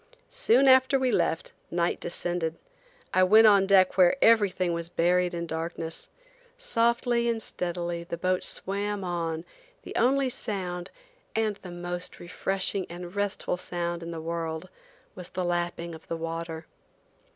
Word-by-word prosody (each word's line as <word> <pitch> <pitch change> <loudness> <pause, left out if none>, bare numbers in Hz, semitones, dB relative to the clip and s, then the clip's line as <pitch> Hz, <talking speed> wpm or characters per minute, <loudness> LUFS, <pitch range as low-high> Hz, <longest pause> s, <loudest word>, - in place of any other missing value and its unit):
Soon 470 - +4
after 260 +1 +6
we 260 -1 +1
left, 165 - 0 0.2
night 170 0 0
descended. 175 -1 -3 0.6
I 185 - +4
went 215 +5 +7
on 200 -2 +6
deck 190 -1 +4
where 180 +4 +6
everything 200 -7 +4
was 170 0 -3
buried 180 +1 +2
in 170 -1 -3
darkness. 165 0 -4 0.5
Softly 235 - +1
and 230 -1 0
steadily 175 -4 -4
the 170 0 -5
boat 185 +1 0
swam 200 +1 -1
on, 165 -2 -2 0.4
the - - -9
only 265 +2 +3
sound–and 215 - -4
the 185 - -10
most 175 0 -5
refreshing 190 +2 -1
and 175 +2 -8
restful 200 -3 -1
sound 175 -1 -3
in 165 - -6
the 165 -1 -5
world–was 170 - -7
the 185 -1 -3
lapping 175 -1 -2
of 160 - -12
the 165 - -3
water. 165 0 -5
180 Hz, 140 wpm, -27 LUFS, 170-215 Hz, 0.6 s, went